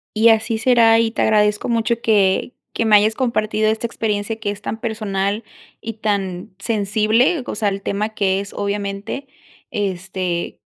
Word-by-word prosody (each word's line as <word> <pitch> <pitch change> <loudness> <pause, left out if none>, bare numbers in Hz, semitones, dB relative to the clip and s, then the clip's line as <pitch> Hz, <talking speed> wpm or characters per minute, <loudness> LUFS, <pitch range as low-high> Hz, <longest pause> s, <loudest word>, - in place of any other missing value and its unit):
Y 220 +2 +5
así 225 0 +2
será, 225 -1 +5
y 225 -1 +1
te - - -2
agradezco 210 0 +2
mucho 235 0 0
que 200 0 +2 0.2
que 230 - -1
me 215 - +6
hayas 215 +1 +4
compartido 215 -4 0
esta 220 +2 -1
experiencia 220 -1 -2
que 210 -2 -2
es 205 0 -5
tan 220 - -4
personal, 215 -2 -2 0.4
y 225 -1 -5
tan 195 -4 -3
sensible. 220 - +1
O - - -3
sea, 210 0 0
el 195 0 -4
tema 205 +2 -2
que 195 -3 0
es 200 0 -7
obviamente, 200 +5 -4 0.4
este, 185 -3 -3
215 Hz, 160 wpm, -20 LUFS, 200-225 Hz, 0.4 s, me